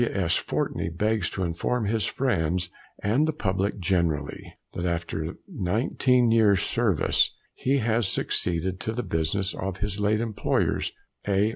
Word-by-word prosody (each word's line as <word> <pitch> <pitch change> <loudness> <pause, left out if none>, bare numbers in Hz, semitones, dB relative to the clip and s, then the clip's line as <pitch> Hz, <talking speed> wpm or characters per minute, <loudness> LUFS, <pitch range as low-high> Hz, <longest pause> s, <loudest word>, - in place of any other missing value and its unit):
W. 115 -4 0
S. 85 -3 +2
Fortey - - -1
begs 105 +3 0
to 95 - -3
inform 90 +7 -1
his 110 +1 +1
friends 90 - 0 0.3
and 125 +10 +3
the - - +2
public 100 -8 -1
generally, 85 -6 -1 0.2
that 85 - -4
after 85 -1 -2
19 125 - +2
years' 105 -5 +4
service, 110 -10 +2 0.2
he 135 +2 +1
has 115 -3 +1
succeeded 90 0 -1
to 110 - -3
the 125 +2 -2
business 80 +5 0
of 95 0 -4
his 100 0 -2
late 105 +1 +2
employers 110 -3 0 0.4
(A. 100 +1 +3
100 Hz, 145 wpm, -26 LUFS, 90-115 Hz, 0.4 s, years